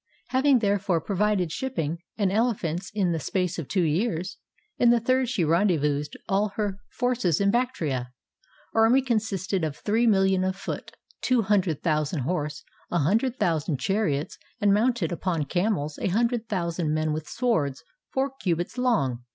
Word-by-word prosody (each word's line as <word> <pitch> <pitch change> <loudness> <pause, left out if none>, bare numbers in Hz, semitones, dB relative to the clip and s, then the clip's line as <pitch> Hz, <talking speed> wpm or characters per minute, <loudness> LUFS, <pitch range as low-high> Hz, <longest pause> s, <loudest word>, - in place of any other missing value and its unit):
Having 265 +1 +4
therefore 200 -5 +1
provided 195 -1 0
shipping 170 - -2 0.2
and 200 -4 +1
elephants 195 -5 0
in 190 -4 +2
the 165 - -1
space 180 +2 -1
of 155 - -5
two 185 -3 +1
years, 175 +3 -1 0.4
in 240 - +5
the 240 0 +5
third 255 +2 +1
she 235 -9 0
rendezvoused 155 -4 +1
all 200 0 +1
her 205 -3 -2
forces 245 - 0
in 200 0 +3
Bactria. 160 - -1 0.6
Her 225 0 +5
army 255 +4 +4
consisted 200 -6 -1
of 155 -3 -2
three 225 +6 +1
millions 190 -3 +3
of 190 - -1
foot, 195 - -6 0.3
two 250 -3 +2
hundred 190 -6 +1
thousand 155 -2 0
horse, 150 +2 -2 0.3
a 175 - 0
hun 170 +7 +3
dred 255 +1 -2
thousand 160 -3 0
chariots, 160 -3 -1 0.2
and 205 -2 +4
mounted 220 -4 +1
upon 170 -3 -1
camels 175 -4 -1
a - - -1
hundred 230 +3 0
thousand 170 -5 -1
men 155 0 0
with 155 0 -5
swords 155 - 0 0.3
four 270 +1 0
cubits 175 +6 -1
long. 140 - +1
190 Hz, 160 wpm, -26 LUFS, 160-225 Hz, 0.6 s, in